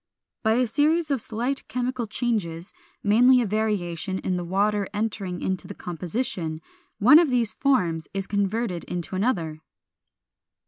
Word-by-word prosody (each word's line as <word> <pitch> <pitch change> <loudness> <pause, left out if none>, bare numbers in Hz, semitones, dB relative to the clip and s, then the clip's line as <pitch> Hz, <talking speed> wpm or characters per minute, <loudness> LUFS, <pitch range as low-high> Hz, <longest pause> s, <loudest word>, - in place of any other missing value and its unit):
By 220 -1 +3
a 250 +2 +3
series 300 +6 +1
of 270 -4 +1
slight 240 +6 -3
chemical 250 0 -2
changes 205 -7 -2 0.3
(mainly 245 +5 +6
a 240 - +1
variation 195 -4 -1
in 185 -1 -2
the 175 - -2
water 200 +3 +1
entering 205 -4 -3
into 190 -1 -2
the - - -8
composition), 175 -1 -3 0.4
one 275 +10 +8
of 335 -4 +3
these 240 -4 +1
forms 175 - +1
is 195 -1 -3
converted 200 -2 -1
into 180 +1 -4
another. 170 -7 -1
210 Hz, 140 wpm, -25 LUFS, 180-245 Hz, 0.4 s, one